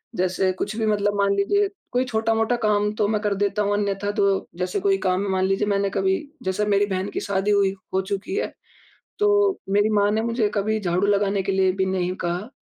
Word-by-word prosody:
जैसे 185 +1 +1
कुछ 210 +1 -3
भी 220 - 0
मतलब 205 -1 +1
मान 200 0 +2
लीजिए 400 - +2 0.2
कोई 250 +1 +1
छोटा-मोटा 225 0 +1
काम 210 0 +2
तो 210 - +1
मैं 215 0 0
कर 210 -2 0
देता 205 +1 0
हूँ 205 0 +1
अन्यथा 205 0 -1
तो 200 -1 +1
जैसे 180 +2 -1
कोई 195 0 +2
काम 185 +1 +1
है - - -3
मान 190 0 +1
लीजिए 195 +2 0
मैंने 200 -1 +1
कभी 190 0 +1 0.3
जैसे 190 +3 -1
मेरी 205 0 +3
बहन 190 0 -2
की - - -3
शादी 200 +1 0
हुई 200 -2 +3 0.2
हो 190 - +2
चुकी 200 - -4
है। - - -2 0.7
तो 415 - +3 0.4
मेरी 205 +2 +3
माँ 205 -1 +3
ने 215 +1 +1
मुझे 230 -1 +1
कभी 215 +2 0
झाड़ू 185 0 0
लगाने 200 -1 +2
के 195 - -1
लिए 190 -1 +3
भी 190 0 0
नहीं 185 -1 -1
कहा, 180 +7 -3
200 Hz, 220 wpm, -23 LUFS, 190-210 Hz, 0.7 s, मेरी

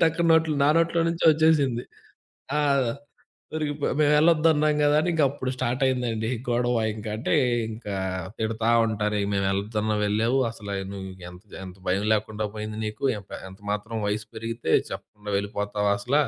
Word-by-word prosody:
టక్కున 165 +1 +3
నోట్లో 160 -1 +3
నా - - +5
నోట్లో 165 0 +2
నుంచే 165 0 -2
ఒచ్చేసింది. 150 -6 +2 0.7
ఆ! - - +3 0.9
దొరికిపోయ. 150 -2 -2
మేమెళ్ళొద్దన్నాం 155 0 +4
గదా 145 0 +4
అని, 160 - -1
ఇంకప్పుడు 140 -4 +1
స్టార్టయిందండీ 125 -3 0 0.2
గొడవ, 120 0 +1 0.2
ఇంకంటే 110 +1 -4 0.4
ఇంకా 105 -2 -5 0.4
తిడతా 110 +1 0 0.2
ఉంటారు, 105 -1 -1
"మేమెళ్లొద్దున్న 100 +2 0
వెళ్ళావు, 110 +5 +1
అసలా 100 -3 -7 0.2
నువ్వు 95 -1 -6 0.2
ఎంత 90 +2 -14
ది - - -8
ఎంత 95 0 -10
భయం 95 +3 +1
లేకుండా 110 0 -1
పోయింది 110 0 -5
నీకు. 110 +6 -6
ఎంప 100 - -15 0.2
ఎంత 95 +1 -14
మాత్రం 105 +2 -3
వయసు 105 0 -2
పెరిగితే, 115 -5 -3 0.2
చెప్పకుండా 105 0 -7
వెళ్ళిపోతావా 105 0 -1
అసల?" 125 +3 -2
115 Hz, 135 wpm, -25 LUFS, 105-145 Hz, 0.9 s, నా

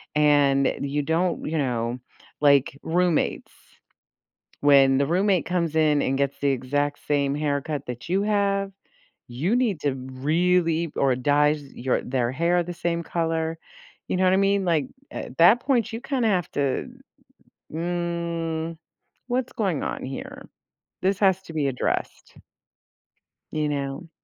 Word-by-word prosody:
and 145 -2 +3
you 140 +1 -1
don't, 165 +4 0
you 160 - -1
know 120 -3 -1 0.4
like 140 -1 +4
roommates. 175 0 0 1.1
When 135 -2 +5
the 140 - +2
roommate 185 +3 +2
comes 170 -3 -1
in 155 -2 +3
and 135 - 0
gets 140 0 -1
the 140 - +1
exact 145 +3 -1
same 140 -1 +1
haircut 145 0 -2
that 125 -1 -7
you 190 +3 +1
have, 200 -1 +1 0.6
you 150 - -1
need 235 -9 +1
to 145 -2 0
really 160 +5 0
or 135 -2 +2
dyes 145 +3 +2
your 125 +1 0
their 125 -2 -1
hair 170 +5 +1
the 175 +1 -6
same 170 0 -2
color. 165 -1 -2 0.5
You - - -1
know 185 - +1
what 185 - +4
I 190 - +4
mean? 195 0 +2
Like, 160 -5 +1 0.3
uh, - - -5
that 175 +8 +7
point, 245 -6 0
you 225 - -4
kinda 260 -4 0
have 180 -4 0
to, 140 -2 -1 0.8
"Mm, 170 -1 -3 0.5
what's 255 0 -2
going 190 -9 -1
on - - -4
here? 135 0 -8 0.5
This 195 +1 +1
has 190 -2 +3
to 165 - -11
be 155 -3 0
addressed." 130 -2 -3 1.2
You 155 -1 -1
know? 140 +3 -4
160 Hz, 145 wpm, -24 LUFS, 140-180 Hz, 1.2 s, that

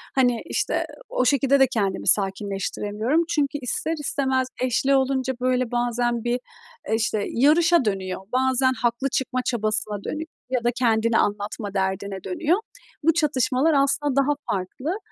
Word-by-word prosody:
hani, 245 -3 +2
işte, - - -1 0.2
o 255 - 0
şekilde 275 +1 +3
de 265 - +6
kendimi 205 -7 -2
sakinleştiremiyorum. 205 - 0
Çünkü 290 -3 0
ister 280 +6 -2
istemez 265 -2 0
eşli 255 +2 +2
olunca, 265 -1 +1
böyle, 255 -1 +1
bazen 240 -1 0
bir, 245 +1 0 0.5
eee, 220 - +2
işte, 215 -2 0
yarışa 320 +3 +4
dönüyor. 190 -3 -2
Bazen 260 0 +2
haklı 240 +2 -1
çıkma 260 -1 -1
çabasına 215 -3 -1
dönüyor 315 +1 -4 0.2
ya 250 -2 0
da 240 - +2
kendini 230 -2 +2
anlatma 205 0 -1
derdine 190 0 -2
dönüyor. 345 +1 0 0.4
Bu, 325 +2 +4
çatışmalar 285 -1 +2
aslında 280 0 +2
daha 275 0 +3 0.2
farklı. 255 - -3
250 Hz, 140 wpm, -24 LUFS, 215-275 Hz, 0.5 s, de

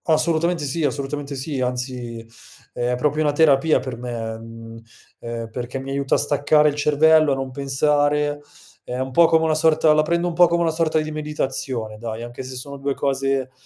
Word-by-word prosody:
Assolutamente 165 0 +1
sì, 155 +4 -2
assolutamente 140 0 -3
sì, 135 0 -3
anzi 125 -2 -4 0.5
è 120 +1 -1
proprio 150 +4 0
una 150 -2 +1
terapia 155 0 +4
per 130 -3 -6
me, 115 -2 -5
mhmm, 115 0 -11 0.4
ehm, 115 -1 -6
perché 125 +2 -5
mi 135 +1 -6
aiuta 140 0 0
a - - +3
staccare 150 +1 +3
il 145 - -4
cervello, 150 0 +4
a - - 0
non 135 -1 -4
pensare. 145 +2 0 0.4
È 125 - -5
un 130 +1 -3
po' 170 +5 +5
come 160 0 +3
una 160 -1 +2
sorta 155 0 +3
la 155 - +4
prendo 170 +3 0
un 175 - -2
po' 175 +1 +6
come 170 0 +1
una 165 - +1
sorta 160 -1 +1
di 155 0 -3
meditazione, 135 -7 -3
dai, 115 0 -5
anche 120 +2 -8
se 130 0 -8
sono 140 +2 -7
2 140 0 -2
cose 135 -1 -1
140 Hz, 195 wpm, -21 LUFS, 125-155 Hz, 0.5 s, po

